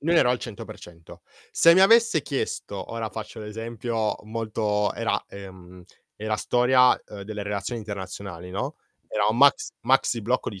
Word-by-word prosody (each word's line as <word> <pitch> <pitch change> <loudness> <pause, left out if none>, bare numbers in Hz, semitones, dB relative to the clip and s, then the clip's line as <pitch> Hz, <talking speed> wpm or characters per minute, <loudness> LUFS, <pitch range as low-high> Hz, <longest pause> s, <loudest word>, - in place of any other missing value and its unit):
non 165 +3 +1
ero 125 -6 +5
al 125 - +1
100%. 85 -6 -10 0.3
Se 170 0 +6
mi 190 - +5
avesse 225 -5 +5
chiesto, 105 -7 -4
ora 115 -1 -3
faccio 110 +1 -8
l'esempio 115 +1 -3
molto 110 -2 -1
era - - 0
ehm, 95 -2 -11 0.3
era 110 0 -2
storia, 125 +2 +4
uhm, 100 -2 -8
delle 105 0 -6
relazioni 105 +3 -3
internazionali, 95 -3 -7
no, 95 - -4 0.3
era 105 -1 0
un 110 - 0
maxi 140 +1 +4
maxi 120 -2 +2
blocco 125 +4 0
di 100 -4 -8
110 Hz, 155 wpm, -25 LUFS, 100-125 Hz, 0.3 s, Se